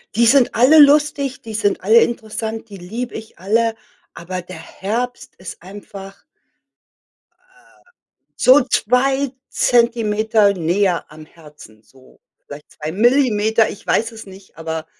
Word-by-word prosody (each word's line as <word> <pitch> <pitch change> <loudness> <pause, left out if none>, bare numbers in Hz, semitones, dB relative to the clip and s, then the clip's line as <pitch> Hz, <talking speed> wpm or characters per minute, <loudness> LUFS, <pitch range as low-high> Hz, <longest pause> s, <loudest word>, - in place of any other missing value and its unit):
Die 235 +2 +3
sind 255 +1 +3
alle 265 +7 +5
lustig, 285 -2 +3
die 225 - -9
sind 205 -2 -1
alle 225 +4 +5
interessant, 225 -1 -4
die 205 - -12
liebe 225 +7 -7
ich 220 -4 -10
alle. 225 +4 0 0.4
Aber 180 +2 -6
der 180 -1 -11
Herbst 245 +8 -5
ist 180 -2 -10
einfach 195 0 -12 1.2
äh, 370 0 -28 0.5
so 265 +3 +5
2 265 +4 0 0.2
Zentimeter 220 -3 +1
näher 180 -1 -1
am 155 0 -13
Herzen, 150 -10 -17
so 130 +2 -23 0.3
vielleicht 145 +1 -12
2 155 0 -7
Millimeter, 220 - +2
ich - - -11
weiß 225 +1 0
es 225 0 -11
nicht, 190 -2 -16
aber 160 -1 -5
220 Hz, 130 wpm, -18 LUFS, 185-245 Hz, 1.2 s, alle